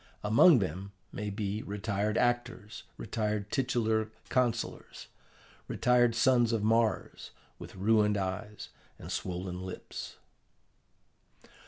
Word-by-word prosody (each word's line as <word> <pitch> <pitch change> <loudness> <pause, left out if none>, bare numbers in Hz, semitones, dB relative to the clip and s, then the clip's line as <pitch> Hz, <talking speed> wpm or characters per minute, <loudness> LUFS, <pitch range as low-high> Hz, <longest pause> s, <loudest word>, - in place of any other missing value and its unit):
Among 115 +9 +6
them 95 0 -3 0.2
may 105 0 -4
be 105 +1 -3
retired 105 +1 -2
actors, 120 -3 -1
retired 105 -2 -2
titular 110 -5 0 0.2
councillors, 120 -3 -1 0.6
retired 120 -1 +3
sons 120 -1 +4
of 115 -3 0
Mars, 115 +1 0 0.3
with - - -10
ruined 105 +1 +3
eyes 100 +2 -4 0.3
and - - -9
swollen 90 0 -4
lips. 95 -1 -7
110 Hz, 100 wpm, -30 LUFS, 100-115 Hz, 0.6 s, Among